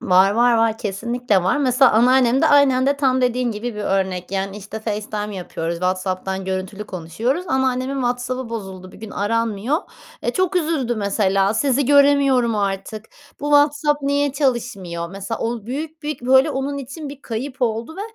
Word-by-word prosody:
Var, 185 +2 +4
var, 240 +2 +4
var. 225 -1 +1
Kesinlikle 230 +1 -1
var. 185 - +1
Mesela 260 -2 +4
anneannem 250 +2 +4
de - - +5
aynen 275 -3 +4
de 285 - +2
tam 260 -2 +2
dediğin 250 -1 +1
gibi 225 +1 -5
bir 210 - -5
örnek. 190 -2 -1
Yani 195 +1 -3
işte 210 +2 -8
FaceTime 210 -1 -4
yapıyoruz, 170 -2 -4
WhatsApp'tan 185 +1 -2
görüntülü 190 +2 -4
konuşuyoruz 215 - -3
ama 265 0 +2
annemin 255 +2 -2
WhatsApp'ı 250 -1 -2
bozuldu 190 -5 -7
bir - - -14
gün 220 -1 -8
aranmıyor. 230 +4 -1 0.5
Eee, - - -1
çok 370 0 0
üzüldü 305 -8 0
mesela 200 -1 +1
sizi 270 +2 +1
göremiyorum 280 -4 +4
artık, 200 +2 -3 0.4
bu - - -6
WhatsApp 290 0 +3
niye 285 0 +1
çalışmıyor. 230 - -2
Mesela 195 +4 -5
o 230 -2 -3
büyük 310 +5 -5
bir, 295 -5 -5
böyle 265 +3 +5
onun 280 +1 -3
için 280 +3 -7
bir 280 0 -10
kayıp 255 +3 -5
oldu 230 +6 -2
ve - - -6
235 Hz, 170 wpm, -20 LUFS, 200-270 Hz, 0.5 s, de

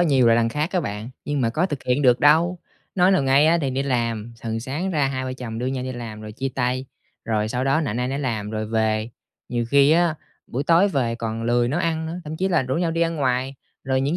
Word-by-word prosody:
nhiều 135 -8 +4
là 115 - +6
đằng 115 0 +2
khác 150 +7 -2
á 180 - +2
bạn, 105 +2 -5
nhưng 145 -2 -1
mà 115 - +1
có 165 +10 +1
thực 145 -7 -5
hiện 125 +3 +1
được 125 -1 +4
đâu, 165 +5 +4 0.4
nói 180 0 +4
nào 185 -7 +3
ngay 135 +3 +4
á, 170 +1 +4
thì 135 -2 -1
đi 135 +2 -1
làm, 115 -3 -2
thường 115 -1 -3
sáng 150 +10 -3
ra 150 -5 +1
hai 130 -1 -3
vợ 130 - -3
chồng 115 -3 -6
đưa 125 - -2
nhau 130 -1 -2
đi 130 - -4
làm 115 -3 -7
rồi 105 0 -8
chia 135 +4 -3
tay, 125 +1 -1 0.4
rồi 110 -1 0
sau 125 +3 -2
đó 135 +4 +2
nạnh 120 -7 -2
ai 125 - -1
nấy 135 +1 -2
làm 110 -7 -2
rồi 110 0 -3
về. 110 0 0 0.4
Nhiều 120 -1 -1
khi 140 +1 +5
á, 170 -1 +3 0.3
buổi 135 +4 -3
tối 170 +4 +5
về 120 -8 0
còn 115 -1 -4
lười 120 +1 +2
nấu 155 +7 0
ăn 160 -2 -1
nữa, 165 - -4
thậm 155 +1 -5
chí 190 +2 0
là 170 - +2
rủ 130 +1 -2
nhau 170 -1 0
đi 165 - -2
ăn 165 -1 +1
ngoài, 130 -1 0 0.3
rồi 130 0 +1
những 145 +6 0
130 Hz, 265 wpm, -23 LUFS, 115-155 Hz, 0.4 s, là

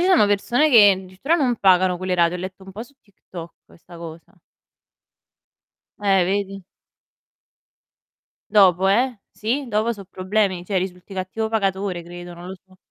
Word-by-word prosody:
ci 355 - +2
sono 355 - +5
persone 235 +8 +2
che 210 -5 +8
addirittura 190 - -2
non 255 -7 +1
pagano 185 -2 +3
quelle 185 0 -2
rate. 170 0 +2
Ho - - -2
letto 185 +1 -8
un 190 - -12
po' 215 +4 -7
su 265 +4 -16
TikTok 175 -4 -12
questa 170 0 -17
cosa. 165 -1 -11 1.7
Eh, 195 -3 +3
vedi? 195 0 -2 1.9
Dopo, 190 -3 +4
eh. 240 +4 +1
Sì, 255 +6 -3
dopo 225 0 0
so' 200 -3 -10
problemi, 185 -1 -1
cioè 195 +1 -3
risulti 180 +1 -4
cattivo 190 +4 -3
pagatore, 195 -4 -1
credo, 175 +1 -10
non 175 +1 -10
lo 190 - -6
so. 185 -1 -23
190 Hz, 155 wpm, -21 LUFS, 180-215 Hz, 1.9 s, che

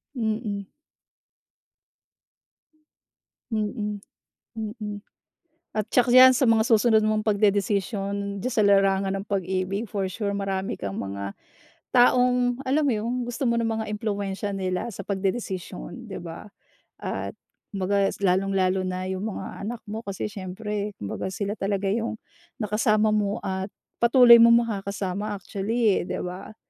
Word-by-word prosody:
Mm. 215 -4 -2 2.8
Mm. 210 -1 -2 0.6
Mm. 210 -2 -5 0.8
At 215 0 0
tiyak 245 +2 +3
diyan 255 +1 +9
sa 270 - +2
mga 220 -1 +4
susunod 225 -2 +5
mong 215 0 +1
pagdedesisyon 200 -1 0
diyan 255 - -1
sa 230 - +1
larangan 195 -1 +3
ng - - -11
pag-ibig 190 +2 -1
for 200 -1 -2
sure 200 +1 -2
marami 195 -1 -2
kang 100 -1 -5
mga, 100 0 -4 0.6
taong 250 0 +3
alam 275 +3 +1
mo 275 - +3
'yong 225 +3 -2
gusto 245 +1 -1
mo 235 - +1
ng 230 - +1
mga 225 -1 -1
impluwensiya 200 -1 -3
nila 185 +3 -2
sa 200 - -6
pagdedesisyon, 190 - -4
'di - - -7
ba, 170 +3 -8 0.5
at - - -5 0.3
kumbaga 195 0 +1 0.2
lalong-lalo 190 0 +2
na 185 0 -3
'yong 185 0 -3
mga 210 - -5 0.2
anak 235 -1 -5
mo 215 0 -5
kasi 200 -4 -5
siyempre 205 +1 -5
kumbaga 100 - -4
sila 200 +2 -3
talaga 195 0 -1
'yong, 225 +1 -2 0.4
nakasama 215 0 +2
mo 205 -1 +1
at 190 0 -2 0.3
patuloy 235 0 +8
mong 235 0 +7
makakasama 200 -1 -3
actually, 205 +3 0
eh, - - -2
'di - - -3
ba? 180 +4 -7
205 Hz, 135 wpm, -25 LUFS, 195-225 Hz, 2.8 s, diyan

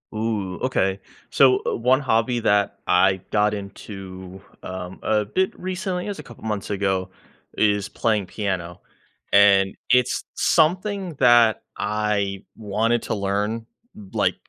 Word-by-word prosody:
Ooh, 105 -4 -2
okay. 95 -7 0 0.3
So, 130 -2 +5
uh, - - 0
one 125 +3 +3
hobby 120 -1 +1
that 100 -2 +1
I 95 +1 +3
got 105 0 +2
into, 95 -2 -8 0.2
um, 90 0 -7
a 110 -1 +2
bit 185 - -1
recently 185 0 -3
as 205 - -4
a - - -8
couple 120 - -14
months 105 -2 -3
ago 95 -2 -1 0.5
is 105 -2 +2
playing 105 -4 0
piano. 90 -4 -4 0.5
And 100 -1 +5 0.2
it's 125 0 +3
something 185 +3 +1
that 120 -3 +5 0.2
I 105 -2 -1
wanted 110 +2 0
to - - -2
learn, 105 +3 -2 0.4
like, - - +1
105 Hz, 130 wpm, -23 LUFS, 95-120 Hz, 0.5 s, So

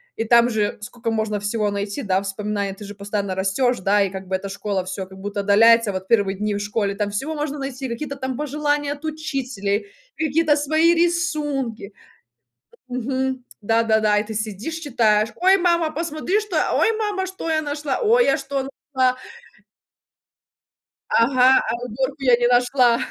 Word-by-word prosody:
И 225 - -1
там 235 +1 +5
же 215 -2 -1
сколько 230 +2 -5
можно 215 -2 -1
всего 210 0 0
найти, 200 +6 -3
да, 190 -4 +1
вспоминая, 200 0 -3
ты 205 +1 -10
же 205 0 -9
постоянно 200 -1 -3
растёшь, 220 +6 +1
да 200 +2 +2
и 195 - +2
как 190 0 -8
бы 190 - +1
эта 195 - -7
школа 195 -1 -3
всё 190 0 -5
как 190 0 -14
будто 200 +1 -3
отдаляется. 225 +2 +5
Вот 190 0 -5
первые 200 -4 +2
дни 210 0 -1
в - - -2
школе 205 -1 -1
там 205 -1 -2
всего 290 +10 -3
можно 295 0 -3
найти, 270 -1 -5
какие-то 280 +4 -4
там 260 -2 -4
пожелания 290 0 -1
от 290 +2 -14
учителей, 270 - -3 0.3
какие-то 315 0 +2
свои 315 +3 +3
рисунки. 295 - -1 1.0
Мгм. 260 +1 -2 0.2
Да-да-да. 220 -1 +2
И - - -1
ты 220 +1 -7
сидишь 215 - -4
читаешь: 225 -8 +2
"Ой, 380 +2 +4
мама, 340 -3 +2
посмотри, 330 +5 -1
что, 415 -5 -6
э! - - +2
Ой, 450 - +3
мама, 415 -3 -1
я - - -4
что 325 -4 -2
нашла! 290 -1 -3
Ой, 480 +1 +4
я - - +3
что 270 -1 -3 0.3
нашла!" 255 -1 +2 1.9
Ага, 255 +2 +4
а - - 0
уборку 265 +4 -3
я 250 -2 +6
не 240 0 +1
нашла. 245 -1 +3
245 Hz, 170 wpm, -22 LUFS, 205-295 Hz, 1.9 s, я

